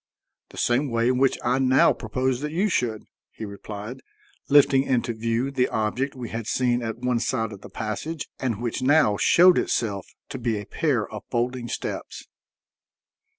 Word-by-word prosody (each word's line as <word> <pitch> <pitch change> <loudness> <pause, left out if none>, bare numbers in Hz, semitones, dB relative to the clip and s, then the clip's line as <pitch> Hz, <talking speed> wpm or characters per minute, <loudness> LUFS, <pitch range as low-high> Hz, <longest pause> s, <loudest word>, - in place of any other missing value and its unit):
"The - - -14
same 130 +4 +1
way 115 0 +1
in 130 0 +1
which 135 -1 +3
I 125 +2 +1
now 130 0 +4
propose 130 +3 -2
that 150 0 -3
you 190 +6 +1
should," 115 - -1 0.3
he 110 - -8
replied, 105 +4 -8 0.5
lifting 140 -2 +6
into 125 -3 0
view 115 +4 -1
the 130 -2 +1
object 120 +6 -2
we 125 -3 -6
had 115 -1 -5
seen 125 -1 +1
at 115 -1 -4
one 125 -1 0
side 115 -2 -1
of 100 -2 -10
the - - -11
passage, 125 +8 -4
and 115 -5 -2
which 120 +1 -2
now 140 -5 +4
showed 180 - +6
itself 100 -5 -1 0.2
to 135 - -6
be 115 -3 -1
a 105 - -8
pair 135 - 0
of 105 -2 -8
folding 120 0 -1
steps. - - -5
125 Hz, 175 wpm, -24 LUFS, 110-135 Hz, 0.5 s, lifting